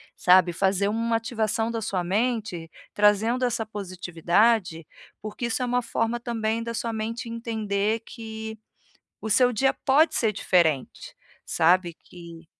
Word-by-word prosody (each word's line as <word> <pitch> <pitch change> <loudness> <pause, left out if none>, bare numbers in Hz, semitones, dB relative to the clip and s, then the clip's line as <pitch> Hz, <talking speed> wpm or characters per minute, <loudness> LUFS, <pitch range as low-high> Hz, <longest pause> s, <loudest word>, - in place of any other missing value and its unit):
sabe. 180 -1 +4
Fazer 195 +2 +1
uma 230 +2 0
ativação 225 -1 -2
da 230 -1 -3
sua 195 -4 -2
mente, 205 -3 -2 0.2
trazendo 210 +5 +2
essa 230 -2 -1
positividade, 185 -1 0 0.4
porque 215 +3 -4
isso 235 +2 -2
é - - 0
uma 245 0 0
forma 230 0 -1
também 230 -2 -2
da 230 0 -5
sua 230 0 -3
mente 230 +2 -4
entender 220 -2 -2
que 220 -1 -8 0.6
o 220 - -5
seu 250 +3 +4
dia 265 +4 +2
pode 295 +5 +3
ser 220 -3 +1
diferente, 170 -8 0 0.3
sabe 175 +1 +2
que 170 -1 -13
220 Hz, 140 wpm, -25 LUFS, 185-230 Hz, 0.6 s, sabe